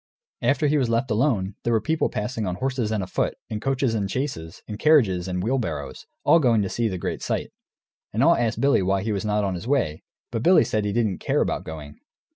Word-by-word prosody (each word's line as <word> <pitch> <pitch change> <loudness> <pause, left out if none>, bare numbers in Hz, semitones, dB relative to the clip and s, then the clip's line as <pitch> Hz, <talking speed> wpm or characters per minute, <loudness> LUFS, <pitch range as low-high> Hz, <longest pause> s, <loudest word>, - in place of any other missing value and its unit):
After 145 +2 +2
he 150 0 +3
was 125 -4 0
left 115 +2 0
alone, 105 -5 +1
there 120 - +1
were 110 - +4
people 160 +7 0
passing 105 0 -3
on 90 - -2
horses 130 -1 -2
and 105 -3 0
afoot, 90 - -1
in 110 - -3
coaches 135 0 0
and 100 -3 -1
chaises, 95 - -4
in 105 -1 -6
carriages 110 - +3
and 90 -1 -2
in - - -1
wheelbarrows, 90 - -3 0.2
all 165 +4 +6
going 115 -7 +3
to 95 - -2
see 115 +3 0
the 95 -4 -3
great - - -4
sight. - - -2 0.6
And - - +1
all - - +6
asked 115 -2 -1
Billy 140 -3 +3
why 95 +1 0
he 110 - -1
was 100 0 -2
not 105 0 +1
on 95 -1 -1
his 90 +5 -6
way. 120 - 0 0.3
But 115 -2 -2
Billy 180 +8 +6
said 105 -1 -1
he 105 - 0
didn't 110 -4 0
care - - 0
about - - -1
going. 75 -2 -9
110 Hz, 235 wpm, -24 LUFS, 95-130 Hz, 0.6 s, all